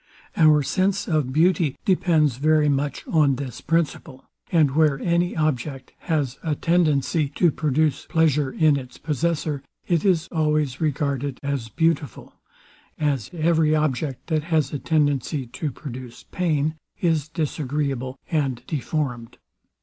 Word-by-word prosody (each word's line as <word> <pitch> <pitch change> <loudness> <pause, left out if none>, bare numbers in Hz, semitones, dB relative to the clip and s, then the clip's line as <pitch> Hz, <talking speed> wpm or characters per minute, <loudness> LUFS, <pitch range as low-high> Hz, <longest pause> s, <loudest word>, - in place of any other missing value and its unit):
Our 155 -2 +5
sense 190 +6 0
of 150 -6 0
beauty 160 -1 +2
depends 160 - +2
very 155 +1 +3
much 140 +1 -1
on 150 -5 +3
this 130 -3 -6
principle; 155 -5 -2 0.3
and 155 -5 +4
where 150 -1 +3
any 175 +1 0
object 140 -3 -2 0.2
has 140 -5 0
atendency 155 -2 +1
to 175 -3 +4
produce 150 -1 0
pleasure 150 -5 +2
in 155 -2 +3
its 130 -2 -8
possessor, 155 -1 -1 0.3
it 170 -3 +1
is 175 -4 +2
always 150 -4 0
regarded 140 -3 -1
as 140 -5 -2
beautiful; 160 - -1 0.6
as 140 -6 -1
every 160 -2 +2
object, 145 -3 -1
that 155 -2 -1
has 160 -3 0
a 145 - -2
tendency 145 -3 0
to 145 +5 -4
produce 125 -3 -9
pain, 155 -3 0 0.2
is 160 -4 +1
disagreeable 140 -4 -2
and 135 -6 0
deformed. 130 -6 -3
150 Hz, 125 wpm, -23 LUFS, 135-160 Hz, 0.6 s, Our